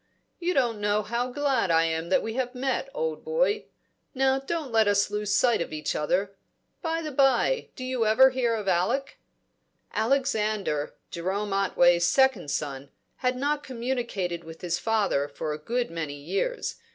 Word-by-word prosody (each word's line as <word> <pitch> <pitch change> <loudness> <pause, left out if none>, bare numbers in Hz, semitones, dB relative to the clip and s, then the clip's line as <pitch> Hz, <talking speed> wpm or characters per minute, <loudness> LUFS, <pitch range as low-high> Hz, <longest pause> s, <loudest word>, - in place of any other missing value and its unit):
"You 355 +1 -1
don't 235 -5 +1
know 205 +1 +1
how 235 +3 -1
glad 270 -7 +1
I 165 0 +4
am 165 +1 -1
that 190 - +3
we 225 - -3
have 250 0 -2
met, 270 - -1
old 480 -1 -3
boy! 475 -2 +1 0.5
Now 265 0 +3
don't 290 0 -4
let 220 -2 +4
us 205 0 +2
lose 210 -1 -2
sight 240 -6 +3
of - - -4
each 155 0 -3
other 195 +6 0 0.5
By 330 -1 -1
the 305 - -4
bye, 270 - +2
do 255 - -7
you 255 -3 0
ever 260 +5 +6
hear 245 -3 +1
of 210 -3 -5
Alec?" 200 +10 0 0.7
Alexander, 215 - 0 0.2
Jerome 195 +4 -2
Otway's 175 -3 +4
second 265 - +3
son, 140 -1 -3 0.3
had 250 -1 0
not 290 +2 0
communicated 235 -9 -3
with 165 0 -11
his 175 -1 -1
father 205 -11 +1
for 150 +1 -4
a 150 - -6
good 240 +6 -2
many 155 -4 -4
years. 195 - -2
225 Hz, 165 wpm, -27 LUFS, 175-265 Hz, 0.7 s, ever